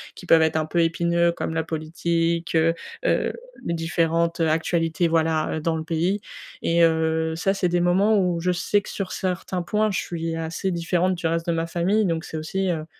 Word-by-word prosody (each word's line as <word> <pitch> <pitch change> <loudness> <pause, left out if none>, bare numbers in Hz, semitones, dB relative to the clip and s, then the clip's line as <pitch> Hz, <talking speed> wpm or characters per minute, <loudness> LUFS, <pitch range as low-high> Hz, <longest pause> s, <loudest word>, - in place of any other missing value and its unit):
qui 180 - -11
peuvent 165 -1 +6
être 160 0 +1
un 155 - 0
peu 170 +1 +1
épineux 170 +1 +2
comme 160 - -4
la 160 - 0
politique, 165 +1 -1
heu 165 +1 +4 0.3
heu, - - +2 0.3
les 170 - -1
différentes 165 0 0
actualités, 165 +1 +1
voilà, 160 -1 +1
heu, - - -4
dans 165 0 0
le 160 - -4
pays 170 +5 0 0.4
et 170 0 +2
heu, 160 0 +1
ça, 195 +4 +1
c'est 180 -2 0
des 175 0 +1
moments 195 +4 +3
où 180 -2 +1
je 180 +1 +1
sais, 205 +3 +1
que - - -10
sur 195 -2 -4
certains 185 0 -2
points, 215 +3 +1
je - - 0
suis 165 -1 -4
assez 165 +4 -3
différente 175 +2 +1
du 170 -1 -2
reste 165 0 -1
de - - +2
ma 165 0 -1
famille. 190 +6 +1
Donc 165 -1 -1
c'est 160 - -6
aussi, 190 +4 -2
heu 155 -2 -3
170 Hz, 210 wpm, -24 LUFS, 160-180 Hz, 0.4 s, peuvent